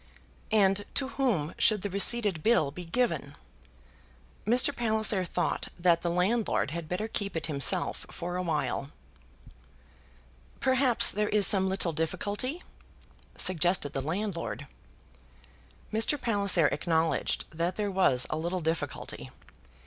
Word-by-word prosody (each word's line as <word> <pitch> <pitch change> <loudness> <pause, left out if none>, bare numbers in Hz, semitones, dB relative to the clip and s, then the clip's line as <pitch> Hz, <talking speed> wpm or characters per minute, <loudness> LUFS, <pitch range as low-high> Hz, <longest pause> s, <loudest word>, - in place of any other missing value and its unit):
"And 205 -2 +3
to 265 -1 0
whom 225 - -1
should 210 -3 +3
the 205 - -2
receipted 200 -3 +1
bill 215 -10 +2
be 175 +4 -8
given?" 165 - -1 1.1
Mr. 245 +3 +3
Palliser 220 -4 +1
thought 175 0 -2
that 170 -1 +3
the 175 - -1
landlord 185 - 0
had 165 -1 -6
better 195 +5 -2
keep 200 -5 -3
it - - -1
himself 140 -4 0
for 175 +1 -5
a 180 - -1
while. 150 -4 -2 1.7
"Perhaps 260 -2 +4
there 210 +1 -1
is 210 -2 +4
some 190 -1 +4
little 185 -3 -1
difficulty?" 205 - -2 0.7
suggested 175 -4 +2
the 135 - -2
landlord. 170 -1 -4 1.3
Mr. 225 +7 +3
Palliser 200 -8 +2
acknowledged 160 +1 0
that 170 +3 -1
there 205 -1 -2
was 160 -10 +2
a 155 - -1
little 175 +3 -3
difficulty. 160 0 -4
185 Hz, 125 wpm, -28 LUFS, 165-215 Hz, 1.7 s, Perhaps